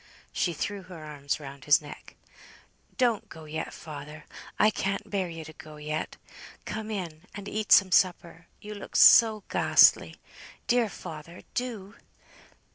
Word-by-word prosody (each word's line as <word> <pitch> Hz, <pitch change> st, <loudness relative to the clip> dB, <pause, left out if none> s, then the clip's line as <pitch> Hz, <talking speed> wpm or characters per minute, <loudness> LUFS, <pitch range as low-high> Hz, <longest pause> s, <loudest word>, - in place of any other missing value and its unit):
She 175 Hz, -, 0 dB
threw 200 Hz, +6 st, -4 dB
her 180 Hz, -4 st, -11 dB
arms 145 Hz, -1 st, -4 dB
round 140 Hz, -1 st, -10 dB
his 145 Hz, -1 st, +6 dB
neck. 145 Hz, -1 st, -12 dB, 0.8 s
"Don't 240 Hz, -5 st, +1 dB
go 160 Hz, -, -11 dB
yet, 155 Hz, +1 st, -5 dB
father; 150 Hz, 0 st, -10 dB, 0.3 s
I 215 Hz, -, +4 dB
can't 195 Hz, -1 st, -3 dB
bear 190 Hz, -3 st, -1 dB
you 165 Hz, -1 st, -8 dB
to 155 Hz, -, -11 dB
go 155 Hz, 0 st, -13 dB
yet. 150 Hz, +1 st, -5 dB, 0.5 s
Come 220 Hz, 0 st, -5 dB
in, 180 Hz, -6 st, -6 dB
and 200 Hz, -1 st, -8 dB
eat 215 Hz, 0 st, -4 dB
some 190 Hz, -2 st, +7 dB
supper; 175 Hz, -2 st, +1 dB
you 210 Hz, 0 st, -8 dB
look 205 Hz, -, -10 dB
so 220 Hz, -3 st, +7 dB
ghastly; -, -, +4 dB, 0.5 s
dear 240 Hz, -3 st, +2 dB
father, 165 Hz, -1 st, -10 dB
do!" 225 Hz, -5 st, -5 dB
175 Hz, 145 wpm, -27 LUFS, 155-205 Hz, 0.8 s, some